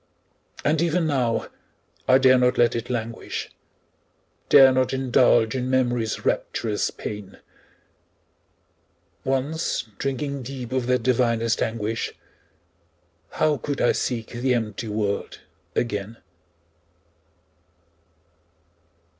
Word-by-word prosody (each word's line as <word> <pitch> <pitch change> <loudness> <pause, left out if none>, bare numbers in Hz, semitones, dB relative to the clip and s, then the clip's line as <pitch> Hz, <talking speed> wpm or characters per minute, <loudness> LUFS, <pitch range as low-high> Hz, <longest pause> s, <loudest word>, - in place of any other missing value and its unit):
And 155 +2 +2
even 170 0 +1
now, 125 -6 0 0.6
I 130 - +7
dare 130 -1 +5
not 125 0 +2
let 120 0 +3
it 120 0 -4
languish, 115 -2 -4 1.0
Dare 135 -2 +8
not 130 0 +1
indulge 125 -3 +3
in 130 -1 -2
Memory's 120 -4 0
rapturous 110 -3 -1
pain; 105 -2 -7 1.9
Once 135 +5 -1 0.2
drinking 140 +1 -2
deep 125 -1 -7
of 130 -2 -1
that 125 -2 +1
divinest 115 -2 +1
anguish, 115 0 -2 1.2
How 150 -2 +2
could 145 +1 -4
I - - +4
seek 115 -3 -2
the 125 +1 0
empty 110 0 -3
world 105 -1 -2 0.3
again? 105 -1 -2
125 Hz, 95 wpm, -24 LUFS, 115-130 Hz, 1.9 s, Dare